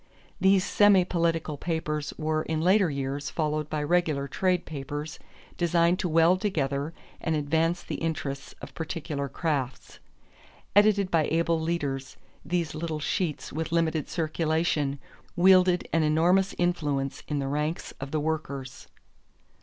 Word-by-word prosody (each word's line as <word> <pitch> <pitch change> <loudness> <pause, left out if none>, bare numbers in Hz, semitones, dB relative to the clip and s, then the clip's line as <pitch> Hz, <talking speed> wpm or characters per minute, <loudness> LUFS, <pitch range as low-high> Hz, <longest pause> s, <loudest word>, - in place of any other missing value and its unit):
These 190 0 +4
semi 205 -3 +5
political 165 -4 0
papers 150 -2 -2
were 155 0 0
in 160 0 -2
later 185 +2 +4
years 140 0 -3
followed 150 -1 -2
by 150 -1 -2
regular 155 -3 +1
trade 180 +4 0
papers 145 +1 -6 0.4
designed 170 +1 +2
to 180 - -1
weld 165 +3 +4
together 145 -6 -1 0.3
and 160 - -1
advance 160 +4 0
the - - -5
interests 145 -4 -3
of - - -8
particular 150 -4 -4
crafts. 135 -6 -3 0.8
Edited 205 -2 +4
by 160 -2 +3
able 165 0 +1
leaders, 145 -5 -3 0.3
these 170 -2 -1
little 155 0 -3
sheets 155 0 -2
with 160 +2 -3
limited 165 -3 0
circulation 155 -3 0 0.4
wielded 185 0 +5
an 165 - +3
enormous 175 +5 +3
influence 150 -6 -1
in 150 - -2
the 140 -1 -1
ranks 150 +4 -2
of 135 - -5
the 155 +2 -1
workers. 145 -4 -4
160 Hz, 135 wpm, -27 LUFS, 145-175 Hz, 0.8 s, semi